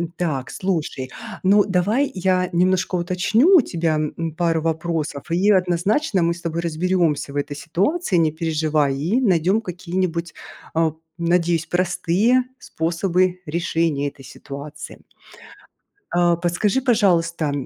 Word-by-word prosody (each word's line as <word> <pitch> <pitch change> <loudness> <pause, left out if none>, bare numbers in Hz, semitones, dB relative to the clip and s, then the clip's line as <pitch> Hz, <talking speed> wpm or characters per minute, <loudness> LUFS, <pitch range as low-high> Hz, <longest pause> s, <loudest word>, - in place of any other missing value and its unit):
Так, 140 -7 -2
слушай, 160 -8 -3 0.3
ну, 200 +2 +5
давай 205 +9 +1
я 185 0 +1
немножко 185 +1 +1
уточню 200 - +3
у - - +6
тебя, 165 -6 -1
м, 155 +2 -2
пару 165 -2 +1
вопросов 160 -3 -2
и 195 +5 +3
однозначно 185 - +1
мы 170 0 +2
с 170 - -11
тобой 170 0 -3
разберёмся 170 -3 0
в - - -10
этой 145 0 -3
ситуации, 200 - -1
не 160 -2 +3
переживай, 155 -3 0
и 180 - 0
найдём 190 -2 +2
какие-нибудь, 180 -2 -3 0.4
а, 160 -1 +1 0.2
надеюсь, 170 -1 +1
простые 185 +7 +1 0.2
способы 180 +2 -1
решения 160 -2 -1
этой 135 - -17
ситуации. 145 +2 -9 1.1
А 175 -1 +3
подскажи, 180 +8 0
пожалуйста, 170 - +2
170 Hz, 120 wpm, -21 LUFS, 160-185 Hz, 1.1 s, у